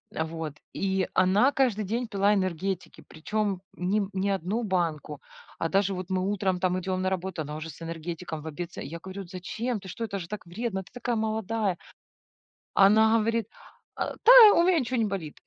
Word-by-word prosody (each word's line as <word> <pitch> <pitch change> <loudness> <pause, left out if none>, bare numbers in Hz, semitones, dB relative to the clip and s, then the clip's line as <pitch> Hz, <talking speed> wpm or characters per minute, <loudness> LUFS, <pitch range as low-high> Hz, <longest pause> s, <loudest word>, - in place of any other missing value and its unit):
А, 160 - 0
вот. 160 -2 -6 0.2
И 190 -1 0
она 195 +8 +4
каждый 245 -7 +1
день 235 +4 -2
пила 200 0 +2
энергетики, 185 -2 -2
причем 200 +3 -2
ним 195 +2 -1
не 195 +1 0
1 195 +5 -1
банку, 165 -7 -2 0.4
а 165 - -1
даже 195 +1 +2
вот 185 0 -6
мы 185 0 0
утром 195 -2 0
там 185 0 +1
идем 185 0 -2
на 185 - +1
работу- 185 -2 -3
она 150 +1 -6
уже 155 +1 -6
с 150 - -11
энергетиком, 165 0 -5
в 155 - -9
обед 165 +3 -6
с - - -7
Я 165 +5 -6
говорю: 190 +2 -7
"Зачем? 210 +6 -4
Ты 190 - -12
что? 230 +5 -6
Это 200 -3 -3
же 170 - -6
так 210 0 -7
вредно, 190 +1 -3
ты - - -20
такая 245 -1 -2
молодая". 220 -3 -1 1.0
Она 220 +3 +5
говорит: 225 -1 0 0.5
"А, - - -3
та, 485 - +8 0.2
и - - +6
у 340 - +4
меня 355 -2 +4
ничё 255 -1 -2
не 225 - +2
болит". 190 -7 -4
190 Hz, 200 wpm, -27 LUFS, 175-215 Hz, 1.0 s, та